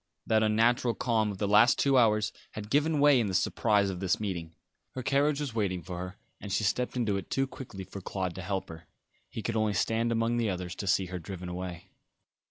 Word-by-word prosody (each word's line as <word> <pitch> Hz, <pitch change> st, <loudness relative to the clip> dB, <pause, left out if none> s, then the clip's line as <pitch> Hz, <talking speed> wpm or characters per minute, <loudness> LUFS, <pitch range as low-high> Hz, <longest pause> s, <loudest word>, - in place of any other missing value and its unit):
That 110 Hz, -1 st, +3 dB
unnatural 115 Hz, +2 st, +2 dB
calm 110 Hz, -4 st, +1 dB
of 100 Hz, -, -7 dB
the 100 Hz, -, -1 dB
last 105 Hz, +4 st, +5 dB
two 140 Hz, -1 st, +3 dB
hours 105 Hz, -4 st, +3 dB, 0.2 s
had 105 Hz, 0 st, -7 dB
given 150 Hz, +1 st, +2 dB
way 145 Hz, -2 st, +6 dB
in 115 Hz, -, +1 dB
the 95 Hz, -, -2 dB
surprise 100 Hz, +1 st, +2 dB
of 90 Hz, -, -6 dB
this 95 Hz, -2 st, 0 dB
meeting. 85 Hz, -6 st, -4 dB, 0.4 s
Her 130 Hz, -, -4 dB
carriage 140 Hz, +3 st, +2 dB
was 145 Hz, -5 st, -3 dB
waiting 95 Hz, -6 st, -1 dB
for 90 Hz, 0 st, -6 dB
her, 90 Hz, +2 st, -6 dB, 0.2 s
and 100 Hz, -, -7 dB
she 100 Hz, -, +1 dB
stepped 125 Hz, +4 st, 0 dB
into 110 Hz, -5 st, +1 dB
it 95 Hz, -, -7 dB
too 135 Hz, -, +1 dB
quickly 125 Hz, -7 st, -9 dB
for 95 Hz, +1 st, -9 dB
Claude 95 Hz, -1 st, -3 dB
to 95 Hz, -, -7 dB
help 95 Hz, +1 st, -3 dB
her; 80 Hz, 0 st, -11 dB, 0.4 s
he 110 Hz, -, -6 dB
could 115 Hz, -, -2 dB
only 110 Hz, -2 st, +1 dB
stand 115 Hz, +5 st, +1 dB
among 115 Hz, +1 st, +1 dB
the 115 Hz, -2 st, +1 dB
others 90 Hz, -1 st, -4 dB
to 100 Hz, -, -5 dB
see 95 Hz, 0 st, +3 dB
her 90 Hz, 0 st, -5 dB
driven 90 Hz, +1 st, -7 dB
away. 90 Hz, -1 st, -6 dB
105 Hz, 225 wpm, -29 LUFS, 95-120 Hz, 0.4 s, way